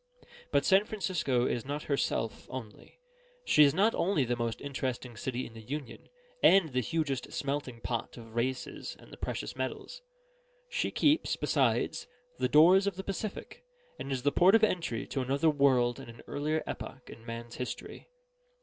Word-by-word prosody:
But -, -, +2 dB
San 195 Hz, +1 st, +5 dB
Francisco 175 Hz, -, 0 dB
is 120 Hz, -, -1 dB
not 145 Hz, +2 st, -4 dB
herself 115 Hz, -6 st, -1 dB
only. 115 Hz, -5 st, -9 dB, 0.5 s
She 150 Hz, -, +6 dB
is 140 Hz, -, +6 dB
not 210 Hz, +5 st, +4 dB
only 170 Hz, -7 st, +1 dB
the 120 Hz, 0 st, 0 dB
most 115 Hz, -1 st, -2 dB
interesting 130 Hz, -3 st, -4 dB
city 125 Hz, +2 st, -3 dB
in 115 Hz, -, -11 dB
the 115 Hz, -, -10 dB
Union, 140 Hz, +3 st, -7 dB, 0.3 s
and 190 Hz, -4 st, +6 dB
the 130 Hz, -2 st, 0 dB
hugest 140 Hz, -1 st, -2 dB
smelting 140 Hz, -4 st, -3 dB
pot 120 Hz, +1 st, -3 dB
of 115 Hz, -1 st, -11 dB
races 125 Hz, +2 st, -3 dB
and -, -, -17 dB
the -, -, -10 dB
precious -, -, -4 dB
metals. -, -, -5 dB, 0.7 s
She -, -, -1 dB
keeps, 300 Hz, +1 st, +2 dB
besides, -, -, +1 dB, 0.3 s
the 130 Hz, -1 st, +1 dB
doors 175 Hz, +8 st, +6 dB
of 200 Hz, -, -1 dB
the 190 Hz, -, -6 dB
Pacific, 200 Hz, -, -5 dB, 0.4 s
and 135 Hz, -, -5 dB
is 130 Hz, -2 st, -2 dB
the 145 Hz, -, +3 dB
port 185 Hz, +7 st, +6 dB
of 225 Hz, -, +4 dB
entry 170 Hz, -, 0 dB
to 135 Hz, -, -3 dB
another 140 Hz, +5 st, +2 dB
world 130 Hz, -4 st, +3 dB
and -, -, -10 dB
an 115 Hz, -, -12 dB
earlier 155 Hz, +2 st, -1 dB
epoch 130 Hz, -, -7 dB
in 115 Hz, -, -12 dB
man's 115 Hz, 0 st, -7 dB
history. 125 Hz, -, -6 dB
135 Hz, 170 wpm, -31 LUFS, 120-165 Hz, 0.7 s, She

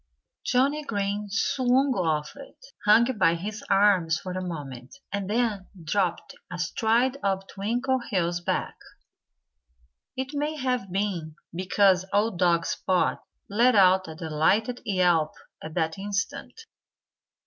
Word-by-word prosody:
Johnnie 280 Hz, +4 st, +1 dB
Green 205 Hz, -3 st, -2 dB
swung 255 Hz, +5 st, +2 dB
off 160 Hz, -6 st, -1 dB
it, 280 Hz, -1 st, -13 dB, 0.3 s
hung 215 Hz, +3 st, +7 dB, 0.2 s
by 170 Hz, -2 st, +4 dB
his 210 Hz, +5 st, -6 dB
arms 195 Hz, -5 st, +4 dB
for 185 Hz, -, -7 dB
a 185 Hz, +1 st, -3 dB
moment, 140 Hz, -, -7 dB, 0.2 s
and 200 Hz, -1 st, -3 dB
then 215 Hz, -4 st, 0 dB, 0.2 s
dropped 175 Hz, +2 st, -1 dB, 0.2 s
astride 225 Hz, +9 st, +1 dB
of 195 Hz, -1 st, -1 dB
Twinkleheels' 210 Hz, -5 st, -1 dB
back. -, -, -2 dB, 1.4 s
It 260 Hz, +2 st, -4 dB
may 295 Hz, +2 st, -2 dB
have 250 Hz, -8 st, -2 dB
been 180 Hz, -5 st, -2 dB, 0.2 s
because 185 Hz, +1 st, +3 dB
old 205 Hz, -2 st, +1 dB
dog 170 Hz, -2 st, +3 dB
Spot 185 Hz, -1 st, 0 dB, 0.2 s
let 235 Hz, +4 st, +3 dB
out 185 Hz, -2 st, +5 dB
a 160 Hz, -, -8 dB
delighted 165 Hz, +10 st, 0 dB
yelp 175 Hz, -5 st, +2 dB, 0.3 s
at 155 Hz, 0 st, -8 dB
that 160 Hz, +1 st, -1 dB
instant. 205 Hz, -, -4 dB
195 Hz, 120 wpm, -26 LUFS, 175-230 Hz, 1.4 s, hung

